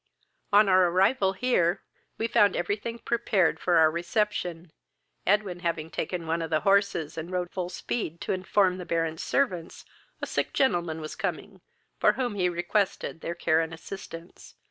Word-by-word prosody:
On 205 Hz, 0 st, +6 dB
our 185 Hz, -1 st, +5 dB
arrival 190 Hz, +3 st, +2 dB
here, 190 Hz, -6 st, +1 dB, 0.3 s
we 225 Hz, -, -1 dB
found 210 Hz, -4 st, +4 dB
every 175 Hz, +4 st, 0 dB
thing 230 Hz, +2 st, -6 dB
prepared 230 Hz, -6 st, +1 dB
for 175 Hz, -2 st, +2 dB
our 160 Hz, -1 st, +6 dB
reception, 175 Hz, -1 st, -2 dB, 0.6 s
Edwin 195 Hz, -2 st, +1 dB
having 165 Hz, -2 st, -3 dB
taken 170 Hz, +1 st, -3 dB
one 165 Hz, +1 st, -1 dB
of 165 Hz, -, -3 dB
the 155 Hz, -1 st, +1 dB
horses, 195 Hz, -6 st, +1 dB
and 160 Hz, +2 st, -6 dB
rode 180 Hz, -1 st, -2 dB
full 180 Hz, -2 st, -3 dB
speed 175 Hz, -2 st, -4 dB
to -, -, -1 dB
inform 185 Hz, 0 st, +1 dB
the 180 Hz, -, -6 dB
Baron's 165 Hz, -1 st, -1 dB
servants 185 Hz, -12 st, -1 dB, 0.3 s
a -, -, -3 dB
sick -, -, -2 dB
gentleman 175 Hz, -, +1 dB
was 155 Hz, -, -6 dB
coming, -, -, -4 dB, 0.4 s
for -, -, +4 dB
whom 250 Hz, -4 st, -2 dB
he 185 Hz, -3 st, +1 dB
requested 175 Hz, -1 st, -1 dB
their 170 Hz, -, -4 dB
care 160 Hz, -1 st, +2 dB
and 160 Hz, 0 st, -4 dB
assistance. 165 Hz, 0 st, -10 dB
180 Hz, 165 wpm, -27 LUFS, 165-200 Hz, 0.6 s, On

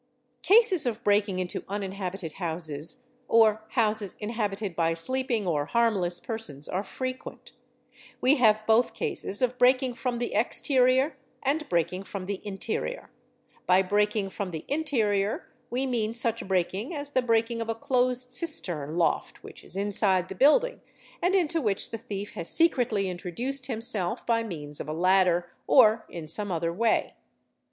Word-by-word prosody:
Cases 390 Hz, -, +5 dB
of 230 Hz, -, -3 dB
breaking 205 Hz, -2 st, +2 dB
into 185 Hz, -1 st, -3 dB
uninhabited 195 Hz, -3 st, -4 dB
houses 160 Hz, +2 st, -1 dB, 0.2 s
or 220 Hz, -1 st, +4 dB
houses 215 Hz, -5 st, +2 dB
inhabited 210 Hz, -3 st, -3 dB
by 165 Hz, 0 st, +1 dB
_ -, -, -7 dB
sleeping 250 Hz, +2 st, +1 dB
or 150 Hz, -4 st, 0 dB
harmless 195 Hz, -7 st, +1 dB
persons 175 Hz, -, -6 dB
are 190 Hz, +2 st, -2 dB
frequent; 255 Hz, +3 st, -7 dB, 0.7 s
we 275 Hz, +4 st, +4 dB
have 215 Hz, -3 st, +3 dB
both 225 Hz, +2 st, +3 dB
cases 200 Hz, +6 st, -2 dB
of 250 Hz, 0 st, 0 dB
breaking 255 Hz, 0 st, +4 dB
from 245 Hz, 0 st, -3 dB
the 240 Hz, 0 st, -3 dB
exterior 260 Hz, +4 st, +2 dB, 0.3 s
and 295 Hz, +3 st, -1 dB
breaking 175 Hz, +2 st, 0 dB
from 195 Hz, -1 st, -7 dB
the 195 Hz, 0 st, -4 dB
interior; 215 Hz, -, -4 dB, 0.6 s
by 185 Hz, +1 st, +5 dB
breaking 205 Hz, +1 st, +1 dB
from 200 Hz, -1 st, -4 dB
the 160 Hz, -3 st, -7 dB
interior 220 Hz, -9 st, 0 dB, 0.2 s
we 255 Hz, +3 st, -1 dB
mean 230 Hz, -3 st, -1 dB
such 230 Hz, -3 st, 0 dB
breaking 190 Hz, -, -1 dB
as 285 Hz, -1 st, -5 dB
the 260 Hz, -, +2 dB
breaking 230 Hz, -1 st, +1 dB
of 230 Hz, -, -4 dB
a 225 Hz, -, 0 dB
closed 250 Hz, +1 st, 0 dB
cistern 175 Hz, -, -2 dB
loft 170 Hz, -, 0 dB
_ -, -, -36 dB
which -, -, -11 dB
is -, -, -9 dB
inside 195 Hz, -2 st, +1 dB
the -, -, -5 dB
building 380 Hz, -, +3 dB, 0.4 s
and 360 Hz, +3 st, +2 dB
into 335 Hz, -3 st, +2 dB
which 205 Hz, -6 st, -2 dB
the 225 Hz, -, -3 dB
thief 205 Hz, -3 st, -6 dB
has 175 Hz, -7 st, -6 dB
secretly 245 Hz, -, +4 dB
intro 180 Hz, 0 st, -5 dB
duced 255 Hz, +8 st, -3 dB
himself 220 Hz, -7 st, -2 dB
by 230 Hz, -1 st, +2 dB
means 150 Hz, -9 st, -6 dB
of -, -, -6 dB
a -, -, -2 dB
ladder, 180 Hz, 0 st, +2 dB, 0.2 s
or 220 Hz, -3 st, +5 dB
in 165 Hz, -3 st, -7 dB
some 205 Hz, +5 st, -3 dB
other 165 Hz, 0 st, -1 dB
way. 225 Hz, +5 st, +1 dB
215 Hz, 160 wpm, -27 LUFS, 185-250 Hz, 0.7 s, Cases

